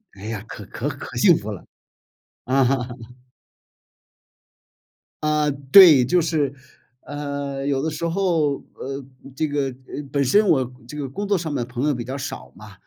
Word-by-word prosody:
哎 95 - -13
呀， 110 -2 -4
可 - - -9
可 - - -4
可 - - -8
幸 - - +6
福 - - -6
了。 - - -8 0.8
嗯。 135 +1 +3 2.6
啊， 150 -1 +2 0.2
对。 165 -10 +9
就 175 +6 +3
是， 150 -4 0 0.5
呃， 140 -1 -5
有 140 -1 0
的 160 - -1
时 155 +2 -3
候， 165 -5 +1 0.2
呃， 135 +1 -6 0.3
这 155 - 0
个 145 -1 -1
呃， 130 +2 -7
本 140 0 +1
身 205 +11 +4
我 130 -7 +2 0.2
这 150 - -8
个 140 -3 -4
工 200 +9 -4
作 200 -1 +2
上 160 -3 -4
的 125 - -1
朋 125 +4 -2
友 150 - +2
比 120 - -4
较 130 +3 -5
少 135 - -6
嘛， 105 -2 -13
145 Hz, 175 characters per minute, -22 LUFS, 130-155 Hz, 2.6 s, 对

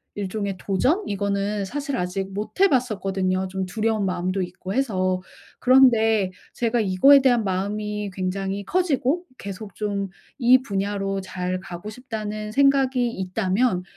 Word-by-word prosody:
일종의 200 -1 -3
도전 260 - +1
이거는 200 0 -1
사실 285 +6 -3
아직 190 +1 -3
못 205 +2 -3
해 395 - +8
봤었거든요 195 - 0
좀 190 0 -3
두려운 215 +2 0
마음도 185 +1 -1
있고 180 +1 -5
해서. 185 -8 0 0.4
그런데 225 -6 +5 0.2
제가 235 0 0
이거에 215 +8 +6
대한 245 -4 +3
마음이 210 +2 -2
굉장히 195 +2 -3
커지고 335 - +1
계속 200 -2 -8
좀 200 -2 -2 0.3
이 255 +1 +6
분야로 195 -3 -2
잘 185 -1 -3
가고 180 +2 -8
싶다는 215 -3 -5
생각이 265 -1 +3
있다면 190 +1 0
205 Hz, 290 characters per minute, -23 LUFS, 190-240 Hz, 0.4 s, 해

